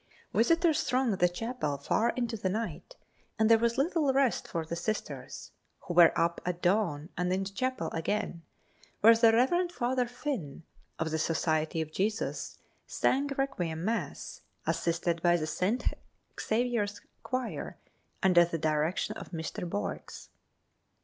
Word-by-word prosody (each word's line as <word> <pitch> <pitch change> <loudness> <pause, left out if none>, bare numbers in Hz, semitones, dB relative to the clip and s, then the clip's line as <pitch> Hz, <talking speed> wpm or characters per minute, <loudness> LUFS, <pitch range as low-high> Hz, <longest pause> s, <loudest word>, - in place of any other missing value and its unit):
Visitors 325 +5 +3
thronged 255 -6 +1
the 180 - +4
chapel 225 - -3
far 220 +11 +1
into 240 -2 -1
the 195 -3 -1
night 230 - -4 0.4
and 220 0 +3
there 225 - +7
was 235 0 +1
little 300 0 +2
rest 270 -2 +1
for 165 -1 -3
the 165 - -4
Sisters, 195 +6 -4 0.3
who 175 - -5
were 170 -1 +8
up 170 0 +1
at 175 -1 -2
dawn 175 -5 +1
and 180 0 -1
in 190 +1 +1
the 195 - -4
chapel 255 +5 -2
again, 170 0 -2 0.6
where 230 +2 +8
the 225 0 +6
Rev. 345 +10 +2
Father 250 -4 0
Finn, 245 - -5 0.3
of 160 0 -2
the 160 - 0
Society 160 0 0
of 155 -1 -5
Jesus, 210 +6 -2 0.3
sang 275 +2 +1
requiem 180 -12 -2
mass, 230 +2 -3 0.2
assisted 170 0 0
by 175 0 +4
the 155 - -2
St. 190 +9 -1 0.6
Xavier's 225 -3 0 0.2
choir, 255 -2 -4 0.5
under 180 -2 +6
the 170 -1 -2
direction 155 +2 0
of - - -9
Mr. 165 +1 -5
Boex. 100 - -5
205 Hz, 145 wpm, -30 LUFS, 170-245 Hz, 0.6 s, were